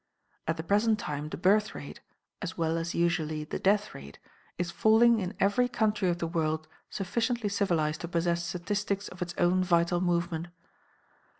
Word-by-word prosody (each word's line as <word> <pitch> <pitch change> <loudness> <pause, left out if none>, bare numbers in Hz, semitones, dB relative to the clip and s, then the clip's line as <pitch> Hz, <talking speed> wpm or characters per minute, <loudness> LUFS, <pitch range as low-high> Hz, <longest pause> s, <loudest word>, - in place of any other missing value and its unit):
"At 160 +1 0
the 160 - -4
present 210 +5 +2
time 150 -6 -4
the - - -5
birth 210 +5 +2
rate - - -8 0.4
(as 185 -2 -5
well 165 -1 0
as 165 +1 -4
usually 160 -3 0
the 150 - -5
death 205 +2 +2
rate) 70 +1 -11 0.4
is 175 -1 -2
falling 225 +5 +5
in 185 +1 -4
every 225 +6 +3
country 215 -5 +1
of 175 - 0
the 170 - -2
world 155 -1 -1 0.2
sufficiently 230 +3 -1
civilized 170 -7 0
to 170 - -4
possess 170 0 0
statistics 200 +3 -2
of 180 - -13
its 175 -1 -3
own 180 +1 +3
vital 175 0 +2
movement. 170 -2 0
175 Hz, 170 wpm, -29 LUFS, 170-205 Hz, 0.4 s, falling